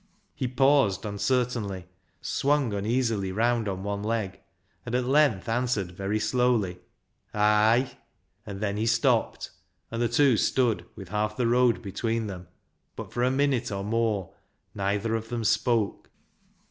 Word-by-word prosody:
He 130 - -2
paused 135 -5 +3
uncertainly, 105 -3 -1 0.4
swung 140 -5 +1
uneasily 110 -1 0
round 115 +2 +1
on 95 -1 -3
one 100 0 -3
leg, 105 -3 -2 0.4
and 120 0 -3
at 125 0 +1
length 135 -7 +3
answered 115 -5 -1
very 100 +4 -2
slowly 105 -5 +1 0.2
— - - -49 0.2
" - - -38
Ay." 110 +5 +3 0.5
And 100 -3 -7
then 100 -1 -1
he 110 +2 0
stopped, 115 0 +1 0.4
and 115 +1 -3
the 120 - +2
two 130 -1 +4
stood 120 0 +1
with 95 -3 -10
half 105 +1 -1
the 125 - +1
road 120 0 +3
between 115 +3 -2
them, 90 -4 -7 0.5
but - - -8
for 120 - -2
a 125 - +3
minute 130 -3 +1
or 100 -1 -3
more 110 -3 -1 0.4
neither 100 +3 -1
of 115 0 -3
them 120 -2 -3
spoke. 115 -1 0
115 Hz, 150 wpm, -27 LUFS, 100-125 Hz, 0.5 s, two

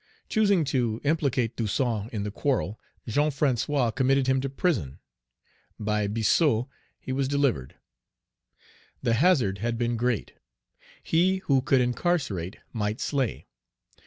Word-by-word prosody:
Choosing 200 -5 +3
to 120 -5 0
implicate 140 -6 0
Toussaint 115 -1 -1
in 105 -4 -3
the 105 - -3
quarrel, 115 -3 -1 0.3
Jean 145 +7 +2
François 135 -3 0
committed 135 0 +2
him 130 0 +2
to 135 - -2
prison. 130 - -1 0.8
By 105 -1 0
Biassou, 115 - +2 0.3
he - - -6
was 135 0 0
delivered. 140 - 0 1.3
The 115 - +2
hazard 120 - +3
had 115 +2 -1
been 120 0 0
great. 120 -1 -1 0.7
He 180 +4 +2
who 135 -5 +3
could 135 0 +3
incarcerate 120 - -1 0.2
might 105 -1 -2
slay. 135 -5 -1
125 Hz, 125 wpm, -26 LUFS, 110-140 Hz, 1.3 s, Choosing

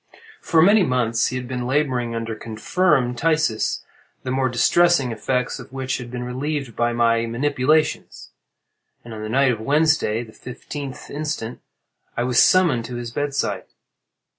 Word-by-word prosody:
For 160 -2 +3
many 205 +4 +6
months 125 -7 +1
he 125 - -4
had 125 -1 -5
been 125 -1 -4
laboring 130 -4 0
under 115 0 -3
confirmed 120 +4 0
phthisis, 155 -8 +1 0.4
the 130 - -3
more 130 0 +1
distressing 135 +3 +3
effects 125 +3 -2
of - - -11
which 130 -1 -3
had 120 -1 -8
been 125 0 -5
relieved 135 0 -4
by 120 0 +1
my 115 -1 +2
manipulations; 145 +5 0 0.7
and 120 - -9
on 110 - -7
the 110 - -5
night 135 +2 +3
of 115 - -3
Wednesday, 145 -4 +2
the 110 -2 -14
fifteenth 135 +1 -8
instant, 145 -6 -4 0.6
I 120 - +1
was 125 0 +3
summoned 165 -11 +4
to 120 +1 -7
his 120 -1 -5
bedside. 145 +2 -2
125 Hz, 155 wpm, -22 LUFS, 120-145 Hz, 0.7 s, many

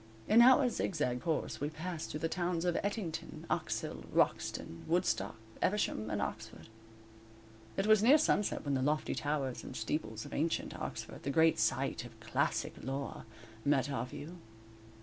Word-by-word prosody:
In 230 +2 +7
our 255 +2 +7
zigzag 150 - -1
course 160 -5 -2
we 145 - 0
passed 160 +1 -5
through 150 - -5
the 165 - +1
towns 175 0 -1
of 175 -1 +1
Ettington, 200 -5 -3
Oxhill, - - -2
Wroxton, 85 - 0
Woodstock, 160 - +1 0.3
Eversham 185 - 0
and 105 - -1
Oxford. 110 +2 -5 1.1
It - - +1
was 215 -1 +6
near 260 +7 +7
sunset 210 - +1
when 140 - 0
the 130 - +1
lofty 150 +3 +1
towers 145 -3 -2
and - - -8
steeples 110 -2 -3
of - - -9
ancient 160 +3 -1
Oxford, - - -5
the 140 - -3
great 160 -1 +4
site 115 +1 +1
of 115 -2 -12
classic 115 - 0
lore, 135 +2 -4 0.4
met 140 -1 +2
our 125 -2 -2
view. 165 +7 -8
150 Hz, 155 wpm, -33 LUFS, 125-180 Hz, 1.1 s, In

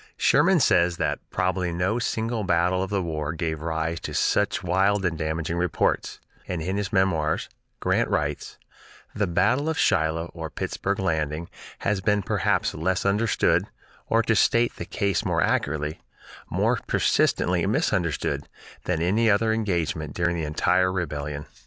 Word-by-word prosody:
Sherman 190 -3 +4
says 85 - +3
that - - -1
"probably 90 -1 -1
no 90 +7 0
single 115 -1 -1
battle 90 0 +2
of 95 - -2
the 100 -2 0
war 80 -2 -3
gave 80 -2 -3
rise 80 +1 -2
to - - -6
such 105 -1 +1
wild 95 +3 +2
and 85 -2 0
damaging 80 +1 -2
reports"; 90 -1 0 0.3
and 90 -2 -3
in 95 +5 -2
his 100 -2 -2
"Memoirs" 85 -5 +1 0.3
Grant - - +1
writes: 75 -1 -2 0.6
"The 105 -1 0
battle 110 - +2
of 160 - -2
Shiloh 80 - +1
or 80 -2 -6
Pittsburg 95 +5 -3
Landing 80 -3 -1 0.3
has 100 -1 0
been 105 0 +1
perhaps - - 0
less 90 +4 -1
understood, 105 +3 +2 0.4
or, 115 +1 +2
to 110 0 +2
state 115 +3 +3
the - - -5
case 100 -4 -1
more - - +1
accurately, 75 +1 -1 0.5
more - - +1
persistently - - +2
misunderstood, 85 -4 0 0.4
than 85 -2 0
any 110 +6 +2
other 110 +2 +3
engagement 85 -7 -2
during 85 0 0
the 80 -2 -2
entire 90 +4 +2
rebellion." 75 -5 -4
90 Hz, 150 wpm, -25 LUFS, 80-100 Hz, 0.6 s, Sherman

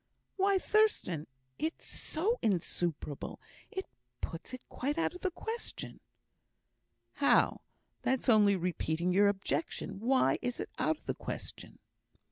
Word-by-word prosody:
"Why, 390 0 +4
Thurstan! 380 - +2 0.3
it's 320 +2 -2
so 415 +10 0
insuperable, 170 -6 -1 0.3
it 380 -3 -4 0.3
puts 165 - -5
it 255 -1 -8
quite 285 +5 -2
out 330 - +1
of 360 - -10
the 380 - +1
question." 450 +6 -5 1.1
"How? - - +4 0.4
that's 260 0 0
only 210 -4 +6
repeating 175 -1 0
your 200 +2 +6
objection. 195 -2 -1
Why 255 +4 +3
is 245 -1 -2
it - - -3
out 315 - +2
of - - -27
the - - 0
question?" - - -6
245 Hz, 125 wpm, -33 LUFS, -, 1.1 s, only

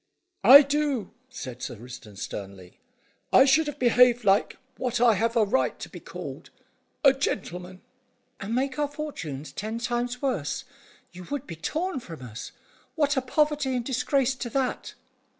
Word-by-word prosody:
"I 280 +3 +11
do," 280 -6 -1 0.2
said 130 - -8
Sir - - -5
Risdon 115 -2 -11
sternly. 95 -3 -8 0.5
"I 265 - +7
should 310 +3 +4
have 295 -1 -5
behaved 245 -1 +4
like 200 0 +2 0.2
what 245 -2 -1
I 240 -1 +6
have 230 +3 0
a 225 - +5
right 235 +6 0
to - - -8
be - - -10
called - - -8 0.5
a 275 -2 +7
gentleman." 185 - -4 0.6
"And 210 +4 -3
make 270 +2 -1
our 295 - +2
fortunes 230 - -6
ten 220 +2 -4
times 240 +1 -2
worse. 245 - -2 0.5
You 180 0 -10
would 285 +3 -4
be 165 - -7
torn 315 - -2
from 165 - -10
us. 120 -2 -8 0.4
What 295 -2 +2
are 265 - +1
poverty 295 0 +1
and 245 -2 -2
disgrace 265 +1 +1
to 240 - -4
that?" 260 +1 -2
245 Hz, 160 wpm, -26 LUFS, 180-275 Hz, 0.6 s, I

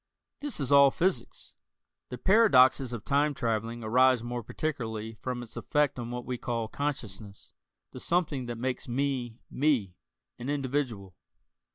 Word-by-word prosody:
This 290 - -4
is 140 -2 -2
all 140 0 +8
physics. 150 -5 -2 0.6
The 125 - -6
paradoxes 135 - +5
of 115 -3 -6
time 145 +1 +2
traveling 115 0 -2
arise 125 +2 +4
more 120 0 -4
particularly 115 -5 -4
from 120 +2 -5
its 115 - -10
effect 150 -3 0
on 120 -1 -5
what 125 0 -5
we 125 -1 -4
call 115 -2 -2
consciousness, 110 -8 -5 0.4
the - - -9
something 155 -7 0
that 120 -1 -4
makes 125 +2 -3
me 125 -2 -2
"me" 130 -10 +1 0.5
an 120 +3 -5
individual. 130 -9 -2
125 Hz, 145 wpm, -29 LUFS, 115-140 Hz, 0.6 s, all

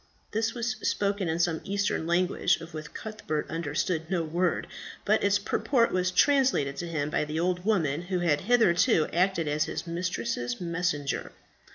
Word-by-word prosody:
This 225 +2 -1
was 235 0 -1
spoken 200 -3 0
in 160 - 0
some 170 -2 +1
Eastern 200 -4 -1
language 175 +1 +2
of 165 +1 -10
which 155 -1 -7
Cuthbert 215 -9 -4
understood 160 +1 -2
no 180 -3 0
word, 170 +3 0 0.4
but 215 +1 +3
its 200 0 +4
purport 230 +4 +1
was 185 0 +1
translated 185 - +3
to 175 - -4
him 155 -3 -2
by - - +1
the 150 +1 -3
old 180 +1 0
woman 165 -9 +1
who 180 +1 -2
had 165 -4 +1
hitherto 205 -5 +4
acted 180 -1 +1
as 150 +1 +1
his - - -4
mistress's 170 - -2
messenger. 170 -4 -2
175 Hz, 165 wpm, -28 LUFS, 160-200 Hz, 0.4 s, its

